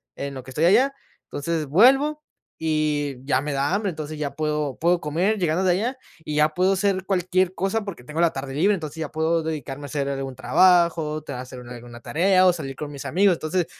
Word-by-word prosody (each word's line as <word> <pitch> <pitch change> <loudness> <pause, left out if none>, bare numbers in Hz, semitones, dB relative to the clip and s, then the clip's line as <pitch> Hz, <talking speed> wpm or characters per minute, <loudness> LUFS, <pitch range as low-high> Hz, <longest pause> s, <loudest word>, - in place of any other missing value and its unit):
en 140 -1 -5
lo 130 - -7
que 130 - -11
estoy 155 +5 +1
allá. 255 +9 +4 0.3
Entonces 155 +2 -3
vuelvo 270 - +4 0.4
y 150 -3 0
ya 135 -2 +1
me 150 0 -3
da 140 +5 0
hambre. 200 -1 0
Entonces 155 -2 -6
ya 140 -2 -3
puedo 150 -3 -2
puedo 175 +1 +2
comer 175 +8 0
llegando 175 +1 +1
de 185 - +3
allá 235 +9 -1 0.3
y 150 - -4
ya 150 +1 +4
puedo 185 +3 +2
hacer 190 -1 0
cualquier 185 -1 +1
cosa 195 +4 -1
porque 185 -12 -8
tengo 150 +5 -3
la 170 - +4
tarde 135 0 -6
libre. 190 +8 +3
Entonces 160 -2 -7
ya 160 -2 -4
puedo 160 +1 +1
dedicarme 145 -3 -5
a - - -6
hacer 140 0 -2
algún 135 -2 -4
trabajo, 170 0 +3
tener 125 -4 -6
hacer 130 0 -9
algu 120 0 -11
alguna 120 0 -11
tarea 185 +3 +3
o 180 - +5
salir 135 -6 -6
con 150 -1 -6
mis 140 - -8
amigos. 190 +2 +3
Entonces, 165 +2 -1
155 Hz, 215 wpm, -23 LUFS, 145-185 Hz, 0.4 s, o